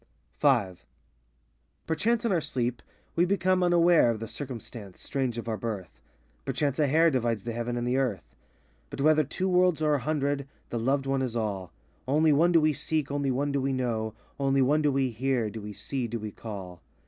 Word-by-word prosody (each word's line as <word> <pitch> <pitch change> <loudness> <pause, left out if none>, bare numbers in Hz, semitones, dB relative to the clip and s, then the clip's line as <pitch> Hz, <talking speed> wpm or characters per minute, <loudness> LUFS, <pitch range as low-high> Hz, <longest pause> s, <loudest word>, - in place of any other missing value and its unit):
V 125 -9 +4 1.2
Perchance 230 +9 0
in 230 - +2
our 175 -3 +2
sleep 125 -5 -1 0.3
we 170 - +4
become 185 0 +2
unaware 175 -5 +5
Of 115 -2 -1
the 115 - -5
circumstance 115 -5 -8
strange 130 -4 -2
of 115 - -5
our 110 -1 -1
birth; 105 -8 -5 0.4
Perchance 140 - -1
a 150 - +4
hair 160 +4 +4
Divides 115 -5 0
the 120 - -3
heaven 120 +1 -3
and 120 0 -2
the 125 +1 +1
earth. 120 -10 0 0.7
But - - -5
whether 155 +1 +5
two 185 +7 -2
worlds 180 -3 +3
or 155 -1 +2
a 145 - +2
hundred, 140 0 -1 0.2
the 120 - -1
loved 135 +4 +1
One 135 0 0
is 125 -3 -2
all; 100 -6 -2 0.4
Only 150 +3 +4
One 165 +5 +4
do 170 - +6
we 155 0 +3
seek, 150 0 -2
only 140 -1 0
One 140 +3 0
do 140 -1 0
we 135 0 0
know, 115 -4 -2 0.2
Only 135 -1 +3
One 150 +4 +3
do 150 -1 +2
we 135 -2 +1
hear, 120 -2 0
do 110 - -7
we 105 0 -7
see, 125 +4 -3
de 115 +1 -3
we 105 -1 -6
call. 95 -6 -8
135 Hz, 200 wpm, -28 LUFS, 115-155 Hz, 1.2 s, do